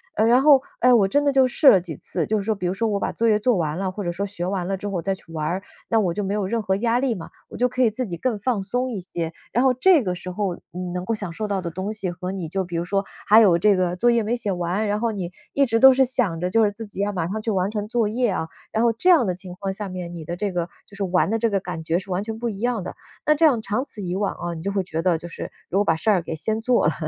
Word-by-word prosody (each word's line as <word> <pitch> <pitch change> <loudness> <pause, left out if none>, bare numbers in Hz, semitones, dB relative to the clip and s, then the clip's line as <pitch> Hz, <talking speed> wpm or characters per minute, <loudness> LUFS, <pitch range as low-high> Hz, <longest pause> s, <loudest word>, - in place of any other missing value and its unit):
呃， 215 - +3
然 240 +3 +5
后， 275 -2 +6 0.2
诶， 250 0 +5
我 200 -5 +4
真 290 +5 +2
的 - - +4
就 270 -2 +4
试 270 +3 +2
了 190 - +6
几 160 -5 -7
次， 170 -4 -3
就 215 - 0
是 200 - -2
说 220 -1 +1
比 185 - -5
如 175 - 0
说 225 +3 -1
我 205 -1 -1
把 - - -1
作 230 - 0
业 210 -1 +4
做 225 0 +2
完 155 -1 -1
了， 190 -1 -2
或 205 - -6
者 175 - -2
说 185 +4 -2
学 185 -3 -5
完 185 -2 -2
了 195 +1 -2
之 205 - -5
后 190 -4 -2
再 195 +4 -1
去 190 - -12
玩 155 -1 -2
儿， 185 +4 -1 0.3
那 225 - +3
我 180 -5 +1
就 205 - -2
没 195 +1 -2
有 205 -2 -1
任 230 +3 -1
何 190 -1 0
压 235 +2 +1
力 255 -4 0
嘛， 165 - -8 0.2
我 - - -9
就 250 +2 +3
可 250 +1 -2
以 230 - +4
自 250 +4 -3
己 175 -4 -5
更 230 +2 -2
放 220 -3 -1
松 245 +6 -1
一 195 - -4
些。 170 -2 -4 0.2
然 245 - +2
后 260 - +5
这 305 +2 +4
个 180 -1 -1
时 180 +1 -7
候， 190 -2 -2 0.2
嗯， 180 0 -5
能 180 0 -3
够 225 - -1
享 200 -6 -4
受 210 +3 -4
到 195 -2 -1
的 170 - -4
东 190 +5 -4
西， 200 -4 -3
和 180 +1 -5
你 185 -4 -4
就 190 +4 -2
比 175 -2 -5
如 170 - -2
说 195 +2 0 0.2
还 215 +2 +8
有 185 -6 +5
这 205 +2 +4
个 180 -1 0
作 240 +6 +3
业 235 -1 +3
没 235 +3 -1
写 205 -4 -1
完， 180 +4 -1
然 210 +1 -1
后 235 -1 +1
你 180 -3 -5 0.2
一 280 0 +3
直 230 -2 0
都 265 - +10
是 265 0 +4
想 230 -10 -1
着 180 +1 -1
就 225 +3 +3
是 205 - +2
自 225 +2 -8
己 200 -1 -5
要 205 +1 0
马 170 -4 -2
上 215 +4 -3
去 220 - -1
完 190 -1 0
成 210 0 -4
作 235 -3 +1
业 240 +3 0
啊， 170 -4 -2 0.2
然 225 +2 +1
后 230 - +3
这 360 +11 +1
样 325 -9 +6
的 180 - -1
情 180 0 -9
况 195 -1 -2
下 200 0 -5
面 180 -1 -6
你 170 -2 -7
的 170 +3 -5
这 200 -1 -2
个 175 -1 -2 0.2
就 200 - -15
是 200 - -3
玩 185 0 +2
的 225 - +1
这 230 0 +1
个 200 -1 +1
感 175 -3 -6
觉 165 +2 0
是 195 - -12
完 180 +2 -1
全 225 +1 -6
不 240 - -2
一 205 -4 -4
样 240 -5 -1
的。 - - -6 0.3
那 305 - +4
这 320 +2 +4
样 245 -7 +4
长 215 +5 -1
此 215 - -10
以 180 -1 -3
往 200 0 -1
啊， 175 0 -5
你 160 -1 -7
就 200 - -1
会 195 - 0
觉 165 -2 -3
得 175 -1 +2
就 170 - -9
是， - - -7 0.2
如 190 - 0
果 205 - +4
把 165 - +3
事 220 - -1
儿 190 -4 +4
给 165 - -5
先 220 +8 -2
做 240 -8 +3
了， 155 - +1
200 Hz, 360 characters per minute, -23 LUFS, 180-225 Hz, 0.3 s, 都